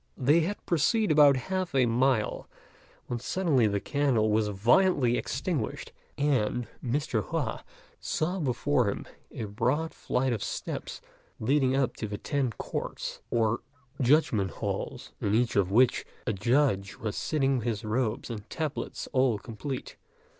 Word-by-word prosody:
They 145 +6 +4
had 185 +6 -2
proceeded 180 +5 +2
about 145 -2 +7
half 185 +3 -3
a 130 -2 +5
mile, 120 -1 +1 0.6
when 120 - -3
suddenly 140 - +2
the 100 -1 0
candle 125 -5 +1
was 110 0 +2
violently 120 - +3
extinguished, 135 -1 -3 0.3
and 125 -5 +1 0.2
Mr. 125 -4 -1
Hua - - -2 0.4
saw 180 +5 -1
before 130 - +1
him - - -4 0.3
a - - -5
broad 125 +10 -1
flight 130 0 0
of 110 - -3
steps - - -5 0.4
leading 130 +2 +2
up 135 -2 +1
to 110 - -3
the 105 0 -4
Ten 140 +3 -1
Courts, - - -5
or 115 0 +1 0.4
Judgment 120 -7 +3
halls, - - -4
in 100 - +1
each 120 +1 +1
of 95 -3 +3
which 120 +5 +4 0.2
a 110 - 0
judge 105 -3 +1
was 110 -2 -4
sitting 135 -4 +1
with 120 - -4
his 110 -3 -2
robes 115 +2 -1
and 105 -2 -7
tablets 155 -2 -4
all 130 -4 +3
complete. 120 +5 -6
125 Hz, 145 wpm, -28 LUFS, 110-145 Hz, 0.6 s, about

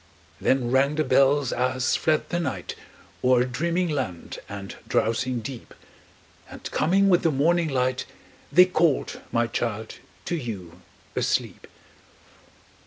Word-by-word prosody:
Then 130 -2 +1
rang 140 +3 +3
the 155 - +1
bells 135 0 +3
as 130 +1 +1
fled 155 -1 +1
the 175 - -1
night 130 - -3 0.5
O'er 125 -1 +4
dreaming 170 +9 -1
land 130 - -4
and 100 -1 -7
drowsing 120 +2 0
deep, 125 +1 -8 0.7
And - - -11
coming 195 +5 +3
with 180 -3 +4
the 165 - +2
morning 165 +4 +2
light, 130 -1 0 0.4
They 180 +1 +8
called, 170 -5 0
my 120 0 +2
child, 110 -1 -4 0.3
to 175 - -1
you 95 - -6 0.3
asleep. - - -1
130 Hz, 125 wpm, -25 LUFS, 120-155 Hz, 0.7 s, They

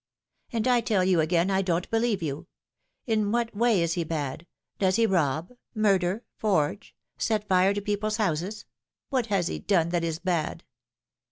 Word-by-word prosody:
" - - -43
And 230 -1 -1
I 245 -2 +4
tell 210 -5 +1
you 185 -2 +3
again 170 +4 +2
I 190 0 +2
don't 180 -2 -1
believe 225 -5 +1
you. 145 -2 -4 0.6
In 215 -4 +1
what 235 -1 -1
way 225 -3 +3
ia - - +3
he 170 +1 0
bad? 155 0 -4 0.3
Does 190 -1 +2
he 230 +1 +4
rob, 165 - 0 0.2
murder, 200 0 +2
forge, 195 -3 0 0.2
set 215 -2 0
fire 190 +1 +3
to 205 - -2
people's 210 +1 -1
houses? 200 +1 -2 0.4
What 255 -4 0
has 195 -4 +1
he - - -3
done 170 -5 +1
that 175 -1 0
is 165 -1 -1
bad 170 -2 -2
190 Hz, 175 wpm, -27 LUFS, 170-215 Hz, 0.6 s, I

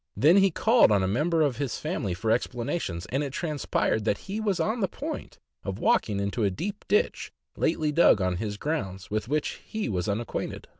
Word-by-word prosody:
Then 165 +7 +6
he 195 0 +6
called 225 - +4
on 100 -2 +3
a - - +1
member 155 - +2
of 135 -6 0
his 140 -3 -2
family 110 - -2
for 110 +5 -1
explanations, 120 - -2
and 135 +3 +1
it 140 - -4
transpired 145 -8 -1
that 105 - +1
he 200 +3 -3
was 200 -4 0
on 220 +8 0
the 195 - +1
point 300 - -6 0.3
of - - -4
walking 105 - +2
into 100 +3 -1
a 100 - +3
deep 185 - -5
ditch 445 +3 +1 0.2
lately 155 -2 +1
dug 150 -8 +5
on 90 -2 0
his 105 +1 -3
grounds, 95 - -3
with 105 +1 -1
which 150 +3 -2
he 220 0 -4
was 90 -1 -1
unacquainted. 110 +3 -3
135 Hz, 200 wpm, -27 LUFS, -, 0.3 s, Then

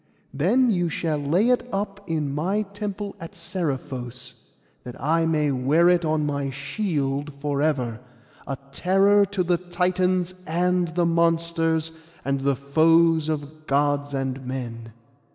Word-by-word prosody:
Then 225 - +3
you 175 -4 +1
shall 155 -2 -1
lay 170 +11 +2
it 250 - +3
up 200 0 -3
in 150 -4 -1
my 190 +8 0
temple 205 0 -5
at 165 - -8
Seriphos, 130 - -4 0.5
that 125 - -9
I 165 +5 +2
may 150 -2 +1
wear 140 +7 +3
it 175 -1 +3
on 155 -1 +1
my 140 -1 -1
shield 145 -1 -2
for 140 0 -2
ever, 125 -7 0 0.5
a 135 - -3
terror 195 +5 +4
to 195 -1 -1
the 175 0 +2
Titans 180 +1 0
and 180 +2 +1
the 175 -1 +2
monsters, 165 -1 +1 0.3
and 140 0 0
the 140 0 +1
foes 160 +3 +3
of 155 0 -5
Gods 145 0 +1
and 135 0 -3
men. 120 -3 -6
160 Hz, 140 wpm, -24 LUFS, 140-180 Hz, 0.5 s, terror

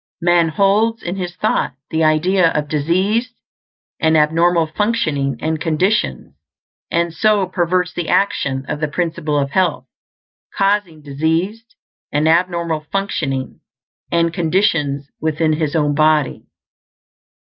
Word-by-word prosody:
Man 175 -1 +3
holds 205 +7 +1
in 175 +2 -3
his 175 -2 -5
thought 210 -10 -1 0.2
the 160 0 +1
idea 165 +3 +3
of 150 -1 -1
diseased 190 - 0 0.6
and 160 0 +3
abnormal 165 +2 +3
functioning 155 - -1
and 160 0 -2
conditions, 165 - 0 0.6
and 170 0 0
so 210 +2 +2
perverts 180 -1 0
the 175 -2 -4
action 140 -9 0
of 150 - -3
the 155 - 0
Principle 160 -1 -2
of 140 -1 -1
Health, 170 -7 0 0.7
causing 195 -6 0
diseased 165 +10 -2 0.4
and 150 +2 +1
abnormal 170 -2 +1
functioning 145 -9 -2 0.5
and 170 -1 +1
conditions 160 -6 0
within 155 0 0
his 155 -1 -2
own 150 -2 +2
body. 155 -1 +1
165 Hz, 120 wpm, -18 LUFS, 150-185 Hz, 0.7 s, Man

